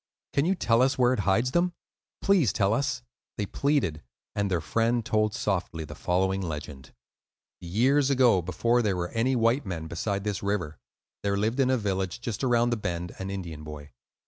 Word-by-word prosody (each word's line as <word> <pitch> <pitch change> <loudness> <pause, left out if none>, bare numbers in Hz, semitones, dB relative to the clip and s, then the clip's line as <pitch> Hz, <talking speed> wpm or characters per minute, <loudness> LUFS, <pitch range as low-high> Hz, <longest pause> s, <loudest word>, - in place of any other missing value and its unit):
"Can 140 - +2
you 190 +3 +2
tell 115 -8 +2
us 130 +1 +3
where 125 0 +4
it 125 - -2
hides 115 +6 +2
them? 175 +3 +2 0.5
Please 185 - +4
tell 100 0 +2
us," 130 0 -1 0.3
they 105 - -1
pleaded; 110 - 0 0.3
and 100 -1 0
their 90 -3 +1
friend 115 +7 0
told 110 0 +1
softly 95 -8 -2
the - - -9
following 95 +2 0
legend:— 75 -5 -6 0.7
Years 130 +11 +2
ago, 125 -8 +4
before 110 +8 +1
there 100 -5 0
were 85 0 -2
any 120 +3 +1
white 120 +4 +2
men 85 -4 -4
beside 100 +5 -2
this 105 -1 -2
river, 95 -7 -2 0.4
there 100 0 0
lived 110 +6 0
in 130 -1 +3
a 130 - +3
village 95 -2 -2
just 120 -1 -4
around 120 -1 +3
the 120 - +1
bend 85 -4 -4
an 95 0 -4
Indian 85 -6 -6
boy. 75 -1 -9
105 Hz, 185 wpm, -27 LUFS, 90-125 Hz, 0.7 s, where